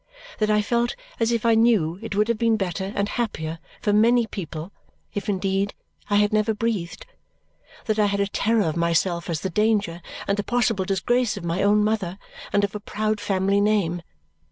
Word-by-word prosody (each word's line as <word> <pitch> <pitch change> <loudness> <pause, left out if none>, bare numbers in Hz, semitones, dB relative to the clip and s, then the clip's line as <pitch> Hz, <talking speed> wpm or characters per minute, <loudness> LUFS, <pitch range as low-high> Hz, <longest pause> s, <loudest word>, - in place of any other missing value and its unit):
That 215 -1 +1
I 210 0 +3
felt 235 +2 0 0.2
as 230 0 +2
if 235 -1 0
I 230 - +5
knew 215 -7 +3
it 225 -3 -5
would 210 +1 +2
have 230 -2 0
been 230 -1 +3
better 190 0 -3
and 200 0 +1
happier 165 -9 -3 0.2
for 205 - +2
many 235 +3 +4
people 170 -4 -6 0.4
if 205 +1 -3
indeed 195 0 0 0.3
I 205 - +2
had 210 +1 +3
never 215 0 +2
breathed. 210 -7 -2 0.8
That 215 -1 0
I 210 - +4
had 200 0 -1
a 200 - +3
terror 215 +2 +1
of 160 -1 -1
myself 170 +1 0
as 160 -3 -2
the 190 - -3
danger 205 -4 +1 0.3
and 200 - +1
the 205 - -1
possible 225 -4 +1
disgrace 210 +5 +1
of 195 - -7
my 170 +3 -1
own 210 +1 +4
mother 210 -4 -1 0.3
and 205 - +2
of 200 - -1
a 210 - -4
proud 215 0 -2
family 200 0 +1
name. 200 -5 +1
205 Hz, 195 wpm, -24 LUFS, 190-220 Hz, 0.8 s, I